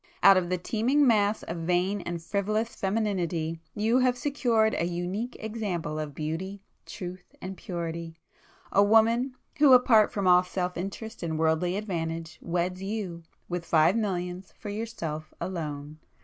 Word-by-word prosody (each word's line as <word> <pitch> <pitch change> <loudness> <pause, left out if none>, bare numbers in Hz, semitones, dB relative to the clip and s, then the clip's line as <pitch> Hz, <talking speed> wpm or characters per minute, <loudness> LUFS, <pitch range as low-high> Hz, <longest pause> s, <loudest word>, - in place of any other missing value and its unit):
Out 195 - +9
of 180 -2 +1
the 185 - +1
teeming 240 +10 +2
mass 215 -3 +3
of 170 - -5
vain 180 +4 0
and 170 -1 -4
frivolous 215 +5 -1
femininity, 180 -6 -1 0.2
you 225 +4 +3
have 255 -1 +2
secured 240 -5 +2
a 170 - +1
unique 180 +8 -3
example 195 -9 -3
of 150 -2 -5
beauty, 185 +6 -4 0.2
truth 180 -2 -8
and 190 +1 -6
purity,—a 170 +1 -3
woman, 230 +5 +4 0.2
who 285 -3 +8
apart 235 -4 +6
from 200 -2 -2
all 180 0 +7
self 180 0 -3
interest 200 +5 -6
and 160 -2 -2
worldly 160 +3 +1
advantage, 165 -5 -4
weds 180 +2 -1
you, 195 -4 -4 0.3
with 175 -1 -3
five 160 +1 +4
millions, 185 -4 -3
for 210 - -7
yourself 170 -8 -5
alone! 155 -4 -5
185 Hz, 145 wpm, -28 LUFS, 170-220 Hz, 0.3 s, Out